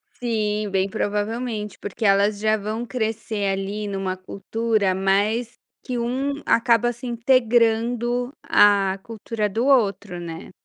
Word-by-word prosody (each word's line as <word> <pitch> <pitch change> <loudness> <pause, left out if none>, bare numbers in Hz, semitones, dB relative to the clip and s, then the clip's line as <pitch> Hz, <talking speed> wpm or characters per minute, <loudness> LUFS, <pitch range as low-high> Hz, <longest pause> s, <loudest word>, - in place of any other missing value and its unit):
Sim, 215 -3 -1
bem 190 0 0
provavelmente. 210 +1 -2
Porque 210 +2 -4
elas 200 +1 +3
já 215 +1 +2
vão 215 +3 -4
crescer 220 -3 -2
ali 200 +2 -3
numa 195 -1 -3
cultura 200 +1 -1
mais 205 +5 0 0.3
que 250 -1 -3
um 270 +5 -2
acaba 235 0 +3
se 245 +1 -8
integrando 240 0 +2
a 200 -2 +4
cultura 220 0 -3
do 225 +5 -1
outro, 205 -8 +2
né. 165 -1 -7
215 Hz, 125 wpm, -23 LUFS, 200-235 Hz, 0.3 s, a